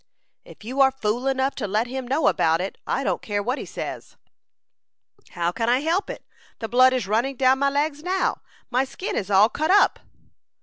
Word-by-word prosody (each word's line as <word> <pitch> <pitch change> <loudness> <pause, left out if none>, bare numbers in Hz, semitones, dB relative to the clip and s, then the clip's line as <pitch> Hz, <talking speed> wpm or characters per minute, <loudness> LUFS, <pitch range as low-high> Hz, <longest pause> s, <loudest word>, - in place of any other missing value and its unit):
"If - - -15
you 255 +5 -1
are 265 - +7
fool 245 0 -2
enough 270 0 0
to 215 - -3
let 215 +4 0
him 255 0 -6
know 280 +5 +1
about 165 0 +2
it, 190 +2 -5
I 275 - -1
don't - - -1
care 205 -1 -2
what 250 +6 -2
he - - -6
says." - - -7 1.2
"How 175 -1 -1
can 230 +5 -2
I 250 +2 +3
help 335 +6 0
it? - - -8 0.3
The 225 - -5
blood 255 +3 +5
is 255 -5 -1
running 235 +7 0
down 260 +1 +3
my 280 0 +2
legs 290 +1 -1
now. 370 +3 -1 0.3
My 255 +2 +2
skin 270 +8 -5
is 200 - -3
all 200 +1 +6
cut 310 +7 -2
up." 400 +2 +4
255 Hz, 205 wpm, -23 LUFS, 215-275 Hz, 1.2 s, are